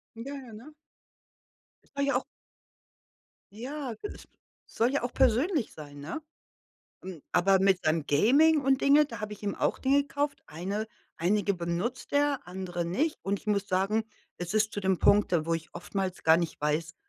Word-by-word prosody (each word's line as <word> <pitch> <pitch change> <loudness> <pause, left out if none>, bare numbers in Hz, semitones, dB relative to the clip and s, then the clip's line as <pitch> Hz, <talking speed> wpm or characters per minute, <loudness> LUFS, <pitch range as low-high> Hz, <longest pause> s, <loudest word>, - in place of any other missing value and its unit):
Ja, 270 +5 -6
ja, 255 -4 -10
ne? 245 +9 -11 1.2
Das 280 0 0
war 280 - +2
ja - - +4
auch - - -7 1.3
Ja 255 +3 -5
g 215 - -23
es - - -11 0.5
soll 240 +4 +2
ja 285 - 0
auch 245 - -3
persönlich 265 - +2
sein, 145 -2 -10
ne? 165 - -5 0.8
M 185 -5 -8
aber 190 +2 +4
mit 190 -1 +2
seinem 155 -1 +1
Gaming 285 - +5
und 270 0 +2
Dinge, 290 +2 +6
da 230 -6 -8
habe 210 0 -4
ich 210 - -10
ihm 200 -1 -2
auch - - 0
Dinge 280 +2 +3
gekauft. 285 0 -3
Eine 195 +7 -4 0.3
einige 200 +4 +1
benutzt 180 +11 -3
er, 285 -1 +2
andere 180 -1 -4
nicht. 280 - -1
Und 200 0 -1
ich - - -23
muss 200 -1 +1
sagen, 200 +4 +1 0.3
es 175 +3 -4
ist 215 0 +2
zu 205 - -3
dem 190 -2 +1
Punkt, 205 -2 +4
wo 165 - 0
ich 160 -1 -5
oftmals 190 -2 -4
gar 160 0 +6
nicht 170 -3 -3
weiß, 155 +2 -1
210 Hz, 180 wpm, -29 LUFS, 175-270 Hz, 1.3 s, Dinge